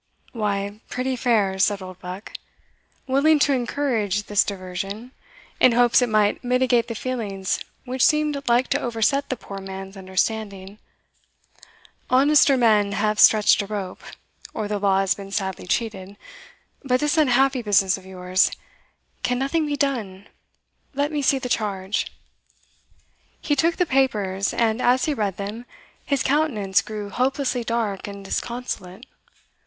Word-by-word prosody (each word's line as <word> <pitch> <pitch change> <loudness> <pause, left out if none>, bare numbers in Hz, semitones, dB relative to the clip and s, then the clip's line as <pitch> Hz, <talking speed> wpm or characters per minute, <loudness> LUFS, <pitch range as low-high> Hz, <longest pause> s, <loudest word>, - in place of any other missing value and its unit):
"Why, 205 -2 -3
pretty 255 +1 -2
fair," 215 -6 +1
said 200 +1 +2
Oldbuck, 185 +1 -9 0.7
willing 280 +4 +3
to 290 -1 +3
encourage 235 -6 -1
this 205 0 +2
diversion, 195 +4 -6 0.5
in 250 - +6
hopes 240 +1 +4
it 245 - +1
might 215 +1 +2
mitigate 250 -1 +2
the 230 - -5
feelings 210 -6 -3 0.3
which 255 0 -1
seemed 300 -2 +2
like 240 +2 +3
to - - +1
overset 245 +4 0
the 260 - -1
poor 195 -4 -9
man's 195 0 -8
understanding; 195 +1 -3 1.3
"honester 275 +1 +5
men 210 -4 +3
have 215 +1 0
stretched 215 -1 +6
a 200 - -6
rope, 195 -3 -5 0.5
or 215 - -2
the 205 0 -2
law 195 -1 +2
has 195 -1 +2
been 195 0 -10
sadly 190 -2 -3
cheated 200 -2 -3 0.7
But 255 -2 +1
this 295 +3 +1
unhappy 270 -3 +3
business 195 -3 +3
of 190 - -11
yours 185 0 +1 0.7
can 245 - 0
nothing 300 +4 0
be 290 - -1
done? 215 -10 -2 0.7
Let 285 +2 0
me 295 -1 -1
see 275 0 +3
the 255 - -4
charge." 205 -4 -2 1.3
He 290 - 0
took 330 +4 +2
the 360 - +2
papers; 210 - 0
and, 225 +1 0
as 250 +1 +3
he 305 - 0
read 205 -7 -2
them, 210 +4 -6 0.4
his 280 -2 0
countenance 260 -10 +1
grew 210 -2 -7
hopelessly 255 0 0
dark 225 -5 -2
and 200 -1 -9
disconsolate. 235 -3 -5
220 Hz, 140 wpm, -23 LUFS, 195-260 Hz, 1.3 s, in